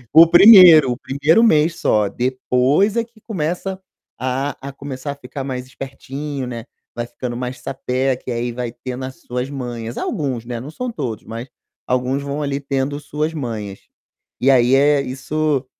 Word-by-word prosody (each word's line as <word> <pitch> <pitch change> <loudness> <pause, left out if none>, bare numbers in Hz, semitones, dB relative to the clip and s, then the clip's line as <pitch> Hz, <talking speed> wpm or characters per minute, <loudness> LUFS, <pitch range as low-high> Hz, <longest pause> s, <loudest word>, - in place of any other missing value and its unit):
É. - - +10
O 165 - +8
1º, 175 - +9
o 120 - -3
1º 145 - +2
mês 165 -6 +3
só, 105 -1 +2
depois 130 - +1
é 230 - +2
que 230 -1 -19
começa 185 -1 -4 0.4
a 130 +3 -2
a 140 +1 -6
começar 140 0 -6
a - - -7
ficar 135 0 -7
mais 130 -2 -4
espertinho, 135 +1 -6
né, 120 -2 -6 0.3
vai 120 - -3
ficando 120 0 -6
mais 125 +1 -5
sapeca 130 0 -2
e - - -2
aí 120 +1 -2
vai 120 0 -4
tendo 125 +2 -7
as 130 0 -8
suas 125 +2 -4
manhas. 120 -4 -6
Alguns, 135 - -3
né, 120 -1 -5
não 130 +5 -8
são 250 +8 -4
todos, 115 - -5
mas 115 +3 -7 0.4
alguns 125 +2 0
vão 140 +1 -4
ali 140 -1 -2
tendo 140 0 -2
suas 150 +2 -3
manhas. 110 -9 -5 0.6
E 135 - +4
aí, 125 0 +4
eh, 145 +1 +4
isso 140 +1 -2
135 Hz, 175 wpm, -19 LUFS, 125-150 Hz, 0.6 s, É